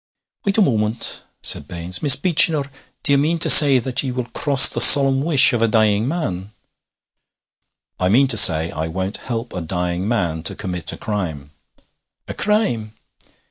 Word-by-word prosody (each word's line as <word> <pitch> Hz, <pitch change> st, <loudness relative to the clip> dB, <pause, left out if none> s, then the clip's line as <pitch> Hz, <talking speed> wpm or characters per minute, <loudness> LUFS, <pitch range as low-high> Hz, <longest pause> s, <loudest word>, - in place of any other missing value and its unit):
'Wait 200 Hz, +1 st, -2 dB
a 215 Hz, -, +2 dB
moment,' 110 Hz, -, -3 dB, 0.2 s
said 75 Hz, -, -2 dB
Baines. 85 Hz, +1 st, -4 dB
'Miss 140 Hz, -3 st, +4 dB
Beechinor, 155 Hz, -2 st, +1 dB, 0.3 s
do 140 Hz, -, 0 dB
ye -, -, +2 dB
mean 155 Hz, +4 st, -2 dB
to -, -, +5 dB
say 140 Hz, -3 st, +8 dB
that 125 Hz, +1 st, -3 dB
ye 135 Hz, -, -6 dB
will 125 Hz, -1 st, -6 dB
cross 140 Hz, -3 st, +4 dB
the -, -, 0 dB
solemn 135 Hz, -2 st, +6 dB
wish 145 Hz, -5 st, +3 dB
of 120 Hz, -, -3 dB
a 115 Hz, -, +1 dB
dying 110 Hz, 0 st, -1 dB
man?' 105 Hz, -, -7 dB, 1.5 s
'I 90 Hz, -, -2 dB
mean 130 Hz, +7 st, +1 dB
to 120 Hz, -, +3 dB
say 85 Hz, -6 st, +5 dB
I 80 Hz, +1 st, -7 dB
won't 95 Hz, +4 st, -7 dB
help 120 Hz, -1 st, -8 dB
a 90 Hz, -, -7 dB
dying 90 Hz, +2 st, -6 dB
man 90 Hz, -9 st, -4 dB
to 80 Hz, -, -8 dB
commit 90 Hz, -2 st, -6 dB
a -, -, -11 dB
crime.' 80 Hz, -10 st, -8 dB, 0.8 s
'A -, -, -8 dB
crime?' 120 Hz, -, -4 dB
115 Hz, 175 wpm, -16 LUFS, 90-140 Hz, 1.5 s, say